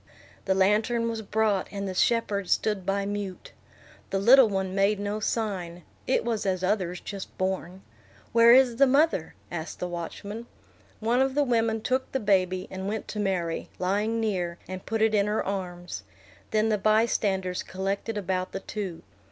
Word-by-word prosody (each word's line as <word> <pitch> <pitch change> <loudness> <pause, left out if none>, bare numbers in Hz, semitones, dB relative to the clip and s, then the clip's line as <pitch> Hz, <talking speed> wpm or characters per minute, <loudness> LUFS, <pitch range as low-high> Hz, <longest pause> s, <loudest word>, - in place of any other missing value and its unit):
The 190 - +2
lantern 215 +5 +2
was 225 -1 -3
brought, 215 -2 +1
and 200 -1 -4
the 190 - -3
shepherds 200 -2 +2
stood 200 -4 -1
by 195 0 0
mute. 200 -2 -5 0.6
The 195 - 0
little 240 +4 +7
one 190 -2 -2
made 200 +1 +2
no 205 +1 -2
sign; 190 -6 -2 0.2
it 255 - +1
was 225 -3 -1
as 185 -2 -1
others 185 -2 0
just 200 -2 -8
born. 185 0 -3 0.5
"Where 230 0 +7
is 250 -2 +6
the 275 +1 +6
mother?" 275 - +2 0.2
asked 170 -1 -5
the 180 - -3
watchman. 200 +6 -6 0.5
One 235 +4 +2
of 265 0 +1
the 290 - +4
women 225 -3 +1
took 260 +1 -1
the 265 - +1
baby, 185 -3 +1
and 190 +1 -5
went 215 +1 -3
to 210 - -4
Mary, 180 -5 -1
lying 205 +5 0
near, 180 -6 -1
and 185 0 -7
put 225 -1 0
it 220 0 +3
in 205 -1 +3
her 210 +1 0
arms. 175 - -4 0.5
Then 215 0 +2
the 210 -2 +1
bystanders 200 -4 +1
collected 195 +3 -3
about 185 -2 -2
the 195 - -3
two. 195 -6 -5
200 Hz, 170 wpm, -27 LUFS, 185-225 Hz, 0.6 s, little